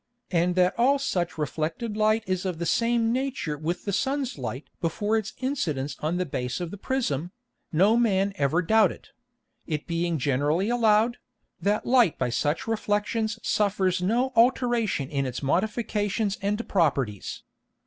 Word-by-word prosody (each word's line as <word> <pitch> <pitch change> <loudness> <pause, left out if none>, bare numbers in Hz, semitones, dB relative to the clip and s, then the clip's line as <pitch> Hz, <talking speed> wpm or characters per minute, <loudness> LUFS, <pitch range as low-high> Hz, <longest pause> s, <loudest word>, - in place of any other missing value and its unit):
And 175 0 +2
that 180 0 +3
all 270 +4 +4
such 180 -11 -2
reflected 160 - -3
Light 215 +1 +2
is 185 -1 -1
of 185 -3 -2
the 170 - -3
same 230 +5 +2
Nature 260 - -2
with 165 +4 -4
the 200 - -2
Sun's 270 +3 -1
Light 125 +3 -5
before 205 +6 0
its 220 -2 -2
Incidence 155 - -2
on 160 +3 -1
the 180 - 0
Base 125 -3 -3
of 175 -2 -4
the 205 - -7
Prism, 175 - -1 0.4
no 195 +8 +4
Man 200 -4 +2
ever 145 +6 +1
doubted; 220 +5 +2 0.6
it 155 -2 -3
being 170 -1 -1
generally 145 - +1
allowed, 230 0 +3 0.4
that 205 +4 +1
Light 240 - +4
by 125 -2 -1
such 145 +5 0
Reflexions 220 0 -1
suffers 195 -3 +1
no 240 +8 +1
Alteration 235 - +2
in 140 -1 -1
its 125 +2 -5
Modifications 210 - 0
and 210 +3 -1
Properties. 135 - 0
195 Hz, 150 wpm, -26 LUFS, 160-225 Hz, 0.6 s, all